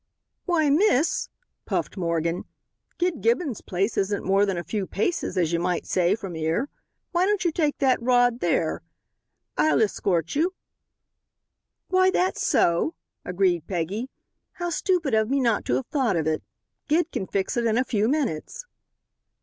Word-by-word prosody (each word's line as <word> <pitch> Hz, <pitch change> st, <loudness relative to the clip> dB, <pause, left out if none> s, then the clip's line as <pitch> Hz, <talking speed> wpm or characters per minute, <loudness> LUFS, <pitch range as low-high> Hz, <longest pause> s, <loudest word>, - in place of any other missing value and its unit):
"Why, 315 Hz, -5 st, +2 dB
miss," 320 Hz, -2 st, +2 dB, 0.4 s
puffed -, -, -2 dB
Morgan, 170 Hz, -1 st, -1 dB, 0.5 s
"Gid 355 Hz, -4 st, -1 dB
Gibbon's 240 Hz, -, 0 dB
place 195 Hz, +4 st, -2 dB
isn't 200 Hz, +1 st, 0 dB
more 195 Hz, +2 st, +3 dB
than 190 Hz, -2 st, -1 dB
a 175 Hz, -, -3 dB
few 195 Hz, +3 st, -3 dB
paces, 215 Hz, -, -2 dB
as 170 Hz, -2 st, +1 dB
you 170 Hz, -, +2 dB
might 175 Hz, 0 st, -1 dB
say, 180 Hz, +2 st, +2 dB
from 195 Hz, -6 st, -7 dB
'ere. 160 Hz, -, -1 dB, 0.4 s
Why 355 Hz, +1 st, +2 dB
don't 410 Hz, -3 st, 0 dB
you 345 Hz, -, +3 dB
take 305 Hz, -3 st, 0 dB
that 260 Hz, -4 st, +2 dB
rod 245 Hz, 0 st, +3 dB
there? 165 Hz, -4 st, 0 dB, 0.8 s
Hi'll 150 Hz, -1 st, +4 dB
h'escort 185 Hz, -6 st, 0 dB
yer." 315 Hz, +4 st, +2 dB, 1.4 s
"Why, 370 Hz, 0 st, +4 dB
that's 370 Hz, 0 st, 0 dB
so," 170 Hz, -, +2 dB, 0.3 s
agreed 180 Hz, -3 st, 0 dB
Peggy, 195 Hz, +7 st, -3 dB, 0.4 s
"how 350 Hz, -1 st, -4 dB
stupid 340 Hz, -, 0 dB
of 220 Hz, 0 st, +2 dB
me 275 Hz, +1 st, +2 dB
not 235 Hz, -5 st, +1 dB
to 125 Hz, -, +1 dB
have 130 Hz, -, -1 dB
thought 260 Hz, -9 st, 0 dB
of 160 Hz, -2 st, 0 dB
it. 155 Hz, 0 st, 0 dB, 0.5 s
Gid 330 Hz, +2 st, +1 dB
can 190 Hz, -, -3 dB
fix 195 Hz, +5 st, -1 dB
it 235 Hz, -1 st, +1 dB
in 225 Hz, 0 st, +1 dB
a 255 Hz, -, +3 dB
few 220 Hz, -4 st, 0 dB
minutes." 285 Hz, -, -2 dB
220 Hz, 160 wpm, -25 LUFS, -, 1.4 s, Hi'll